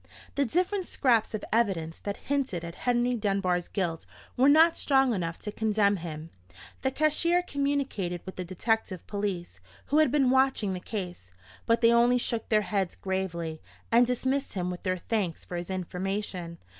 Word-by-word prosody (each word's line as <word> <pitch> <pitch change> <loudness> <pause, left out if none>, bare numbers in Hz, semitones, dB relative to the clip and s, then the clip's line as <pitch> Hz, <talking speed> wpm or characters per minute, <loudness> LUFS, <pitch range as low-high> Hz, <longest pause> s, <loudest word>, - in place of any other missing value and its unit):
The 280 - +1
different 365 - 0
scraps 235 -4 +2
of 215 - -5
evidence 185 -8 0
that 200 -1 -4
hinted 270 -12 -2
at 170 - -6
Henry 245 +4 +1
Dunbar's 195 -5 0
guilt 170 -5 -3 0.3
were 265 +3 +5
not 320 +3 +6
strong 270 -3 +3
enough 165 -4 -2
to 210 - -6
condemn 210 -2 +2
him. 160 -2 -7 0.5
The 265 - +1
cashier 310 +5 +2
communicated 275 - -2
with 190 - -7
the 185 - -4
detective 185 0 -1
police, 195 - -4 0.3
who 295 - +2
had 310 -5 +4
been 270 -3 +3
watching 260 -7 +2
the 180 - -4
case; 180 - -6 0.4
but 230 +1 +3
they 230 0 +6
only 240 +1 +5
shook 235 -2 -1
their 215 -1 +3
heads 195 -4 -1
gravely, 170 -4 -3 0.3
and 235 +1 +5
dismissed 260 +2 -1
him 180 -1 -1
with 180 - -7
their 185 -1 -1
thanks 185 -3 -2
for 180 - -6
his 175 +1 -5
information. 185 -1 -3
210 Hz, 170 wpm, -28 LUFS, 180-255 Hz, 0.5 s, not